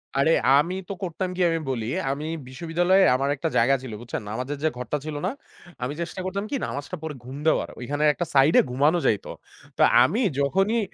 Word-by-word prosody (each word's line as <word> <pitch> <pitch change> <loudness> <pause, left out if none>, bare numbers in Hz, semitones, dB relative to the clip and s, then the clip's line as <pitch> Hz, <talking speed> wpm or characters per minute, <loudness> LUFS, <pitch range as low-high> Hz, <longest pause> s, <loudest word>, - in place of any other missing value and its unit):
আরে 140 +4 +3 0.3
আমি 170 +5 0 0.2
তো - - -2
করতাম 180 +1 -3
কি 185 - -2
আমি 165 0 0
বলি, 115 -4 -2 0.3
আমি 145 +2 -4 0.2
বিশ্ববিদ্যালয়ে 175 +7 +2
আমার 135 +2 0
একটা 160 +4 -2
জায়গা 130 +4 +4
ছিল, 125 - -7
বুঝছেন? 120 - -5
নামাজের 130 +6 -4
যে 155 - +3
ঘরটা 125 +4 -2
ছিল 155 -1 -4
না? 195 - 0 0.5
আমি 135 +4 -2
চেষ্টা 170 +2 -5
করতাম 200 +2 -3
কি - - 0
নামাজটা 145 +6 -5
পড়ে 155 -3 -5
ঘুম 130 +3 -8
দেওয়ার। - - +2
ঐখানে 145 +4 -2
একটা 175 - -3
সাইডে 140 +4 +6
ঘুমানো 150 +7 +3
যাইত। 105 - +1 0.5
তো - - +4 0.2
আমি 215 - +1 0.2
যখনই 195 +11 +2
150 Hz, 190 wpm, -25 LUFS, 135-175 Hz, 0.5 s, সাইডে